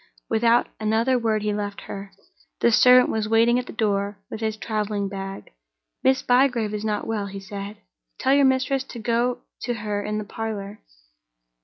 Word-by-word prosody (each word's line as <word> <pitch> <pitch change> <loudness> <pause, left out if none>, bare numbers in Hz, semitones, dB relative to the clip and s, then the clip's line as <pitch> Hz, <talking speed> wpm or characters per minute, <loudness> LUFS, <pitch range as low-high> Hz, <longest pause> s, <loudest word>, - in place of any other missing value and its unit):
Without 230 +2 +3
another 225 +4 +2
word 220 -2 0
he 210 0 0
left 205 -1 -4
her. 195 0 -8 0.5
The 235 - +4
servant 250 +2 +6
was 215 -1 -1
waiting 230 +2 +4
at 250 - -6
the - - -7
door 205 -2 -1
with 220 - -5
his 220 -1 -1
traveling 210 -2 -2
bag. 195 0 -7 0.5
"Miss 265 0 +3
Bygrave 245 -4 +2
is 210 0 -3
not 210 -1 -1
well," 215 -3 -2
he 195 0 -7
said. 200 +1 -7 0.4
"Tell 265 +1 +2
your 280 0 +5
mistress 265 0 +2
to 250 - -10
go 235 +2 0 0.2
to 245 - -2
her 210 -2 -3
in 210 0 -2
the 215 - -2
parlor." 210 -1 -5
220 Hz, 175 wpm, -24 LUFS, 205-240 Hz, 0.5 s, servant